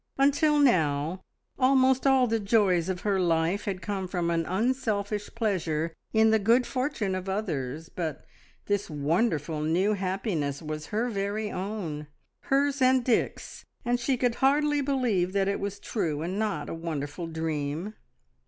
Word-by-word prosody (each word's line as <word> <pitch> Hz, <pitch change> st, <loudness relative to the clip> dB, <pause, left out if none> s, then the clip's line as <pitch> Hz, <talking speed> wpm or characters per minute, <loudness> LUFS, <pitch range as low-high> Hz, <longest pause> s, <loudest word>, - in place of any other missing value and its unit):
Until 285 Hz, +2 st, +3 dB
now 165 Hz, -, +2 dB, 0.4 s
almost 265 Hz, 0 st, +4 dB
all 265 Hz, -2 st, +5 dB
the 225 Hz, -1 st, 0 dB
joys 195 Hz, -5 st, +2 dB
of 180 Hz, -2 st, -2 dB
her 200 Hz, -2 st, +1 dB
life 170 Hz, +2 st, +1 dB
had 195 Hz, -2 st, -3 dB
come 195 Hz, -2 st, -3 dB
from 175 Hz, -2 st, -1 dB
an 165 Hz, -1 st, 0 dB
unselfish 210 Hz, -1 st, -1 dB
pleasure 170 Hz, -8 st, -1 dB, 0.2 s
in 220 Hz, 0 st, +4 dB
the 220 Hz, -, +4 dB
good 235 Hz, +5 st, +3 dB
fortune 255 Hz, -7 st, -1 dB
of 185 Hz, +1 st, -4 dB
others, 160 Hz, -7 st, -3 dB
but 160 Hz, -5 st, -5 dB, 0.4 s
this 205 Hz, 0 st, -1 dB
wonderful 155 Hz, +1 st, 0 dB
new 175 Hz, +7 st, +2 dB
happiness 185 Hz, -, -2 dB
was 155 Hz, -1 st, -6 dB
her 225 Hz, +4 st, -1 dB
very 205 Hz, +1 st, -2 dB
own, 180 Hz, -7 st, -4 dB, 0.4 s
hers 280 Hz, 0 st, +1 dB
and 255 Hz, -1 st, +4 dB
Dick's, 245 Hz, -, -1 dB, 0.2 s
and 240 Hz, 0 st, +1 dB
she 255 Hz, +2 st, 0 dB
could 245 Hz, -1 st, +1 dB
hardly 295 Hz, +2 st, +3 dB
believe 240 Hz, -10 st, 0 dB
that 195 Hz, -1 st, +1 dB
it 200 Hz, -, 0 dB
was 200 Hz, 0 st, -3 dB
true, 160 Hz, -8 st, -2 dB
and 185 Hz, +4 st, -3 dB
not 215 Hz, -2 st, -1 dB
a -, -, -4 dB
wonderful 165 Hz, -1 st, -4 dB
dream. 160 Hz, +3 st, -3 dB
200 Hz, 155 wpm, -27 LUFS, 165-235 Hz, 0.4 s, all